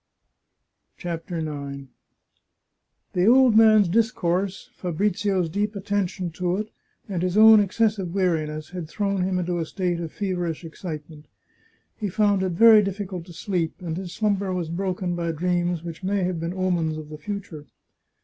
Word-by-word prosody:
CHAPTER 170 0 -5
IX 140 -3 -5 1.2
The 180 +2 +2
old 250 -1 +6
man's 215 -3 +6
discourse, 195 -2 0
Fabrizio's 185 +1 0
deep 205 +5 -2
attention 195 -3 -2
to 180 +2 -1
it, 215 +1 -4 0.4
and 185 -5 -3
his 185 +2 0
own 220 0 +9
excessive 205 -2 +1
weariness, 160 -5 -1
had 175 -4 -6
thrown 200 -1 -1
him 185 0 0
into 175 -1 -1
a 165 - -1
state 180 -2 -2
of 165 -2 -5
feverish 175 -4 -3
excitement. 155 -2 -8 0.7
He 210 -3 -3
found 205 0 +2
it 185 -2 -1
very 220 +3 +8
difficult 195 -3 -4
to 175 - -11
sleep, 170 -1 -2
and 170 -3 -4
his 180 0 -6
slumber 200 -1 0
was 175 -3 -2
broken 180 0 -2
by 170 -1 -1
dreams 175 0 -1
which 170 +1 -8
may 195 0 0
have 180 -2 -1
been 165 +2 -4
omens 175 -4 0
of 155 -1 -8
the 150 -1 -9
future. 185 -5 -6
180 Hz, 155 wpm, -24 LUFS, 170-200 Hz, 1.2 s, own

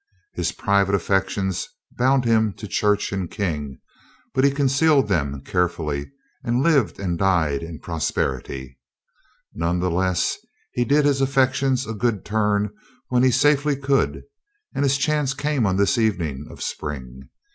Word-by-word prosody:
His - - -1
private 100 -1 +2
affections 95 0 0 0.2
bound 130 +1 +2
him 110 -3 +3
to 105 - -8
church 105 +1 +1
and 95 -3 -3
King, 75 - -3 0.6
but 130 -1 +2
he 140 - +6
concealed 140 0 +3
them 70 -8 -1
carefully 80 -5 -1 0.3
and 120 +1 +1
lived 145 -8 +2
and 90 -4 -2
died 85 -7 +2
in 85 -1 -7
prosperity. 65 -5 -3 0.7
None 85 +2 -1
the 90 0 0
less, 90 0 0 0.3
he 120 - 0
did 145 +2 +3
his 140 -2 +2
affections 135 -1 +2
a 110 - -4
good 110 -1 -1
turn 105 -1 +1 0.4
when 125 -1 +2
he 130 - +5
safely 145 +3 +3
could 135 0 0 0.5
and - - -2
his 140 0 +3
chance 145 -1 0
came 140 -4 0
on 95 0 +1
this 100 +6 +2
evening 85 -11 -1
of - - -8
spring. 65 -3 -6
105 Hz, 145 wpm, -23 LUFS, 85-135 Hz, 0.7 s, he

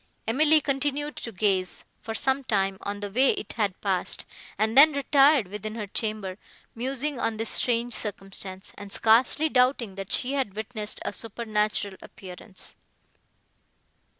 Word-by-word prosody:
Emily 305 +6 +5
continued 290 +1 -2
to 230 - -5
gaze, 190 -2 0 0.2
for 225 - -6
some 265 +3 +1
time, 195 -5 0
on 205 0 -5
the 205 -1 -5
way 260 +6 +4
it - - -6
had 205 -4 -1
passed, 190 -3 0 0.3
and 220 +3 0
then 300 +3 +8
retired 280 -3 +4
within 210 +3 -6
her 220 -2 -4
chamber, 210 -2 -3 0.3
musing 265 +3 -3
on 225 -2 -1
this 225 0 -1
strange 240 0 +1
circumstance, 195 -2 -4
and 205 -1 -9
scarcely 240 +8 +3
doubting, 250 -6 +2
that 195 0 -7
she 260 +2 +2
had 260 -8 -2
witnessed 215 -1 -5
a - - -2
supernatural 210 -3 -2
appearance. 185 +1 -11
220 Hz, 145 wpm, -26 LUFS, 200-265 Hz, 0.3 s, then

